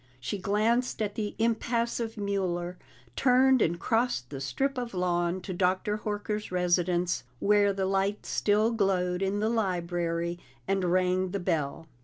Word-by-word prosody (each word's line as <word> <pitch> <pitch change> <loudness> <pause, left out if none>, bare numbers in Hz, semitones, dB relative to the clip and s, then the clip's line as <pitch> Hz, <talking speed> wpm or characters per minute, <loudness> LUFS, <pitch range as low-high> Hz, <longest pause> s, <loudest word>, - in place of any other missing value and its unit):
She 130 +11 -4
glanced 220 +6 +1
at 210 -2 -1
the 210 -1 -3
impassive 230 0 0
Mueller, 185 -3 -2 0.4
turned 260 0 +4
and 170 +1 +1
crossed 225 - 0
the 135 -2 -5
strip 270 - -1
of 235 -5 -5
lawn 175 0 0
to 185 +1 -5
Dr. 185 +3 +1
Horker's 210 0 -3
residence, 180 0 +1 0.2
where 205 0 +4
the 195 -1 -1
light 195 +2 0
still 215 +2 +2
glowed 185 -4 +1
in 195 +1 0
the 215 - +2
library, 175 -5 -1 0.3
and 195 -1 +1
rang 185 0 +2
the 200 +2 -3
bell. 160 -2 -2
195 Hz, 145 wpm, -28 LUFS, 180-215 Hz, 0.4 s, turned